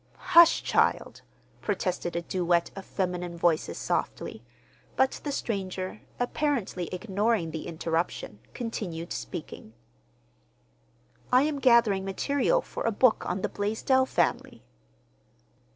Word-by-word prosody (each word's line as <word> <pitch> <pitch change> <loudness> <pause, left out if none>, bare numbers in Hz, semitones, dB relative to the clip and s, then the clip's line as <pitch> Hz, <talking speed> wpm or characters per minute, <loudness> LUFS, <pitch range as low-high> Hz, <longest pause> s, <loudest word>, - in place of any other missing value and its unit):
"Hush, 340 -1 +7
child!" - - +1 0.4
protested 180 -4 -2
a 170 - -1
duet 175 -1 +1
of 195 -1 -8
feminine 180 -2 -3
voices 165 -2 +1
softly; - - -3 0.5
but 265 0 +1
the 290 - -2
stranger, 190 -5 -3 0.2
apparently 245 - -1
ignoring 200 -2 0
the 160 0 -5
interruption, 165 -9 -3 0.2
continued 180 -8 -4
speaking. 155 - -7 1.6
"I 255 +2 +6
am 295 -1 -1
gathering 235 -7 +4
material 280 - +1
for - - -6
a 230 - +2
book 225 +2 +3
on 185 +2 -2
the - - 0
Blaisdell 225 +6 +1
family." - - -1
195 Hz, 110 wpm, -28 LUFS, 175-245 Hz, 1.6 s, Hush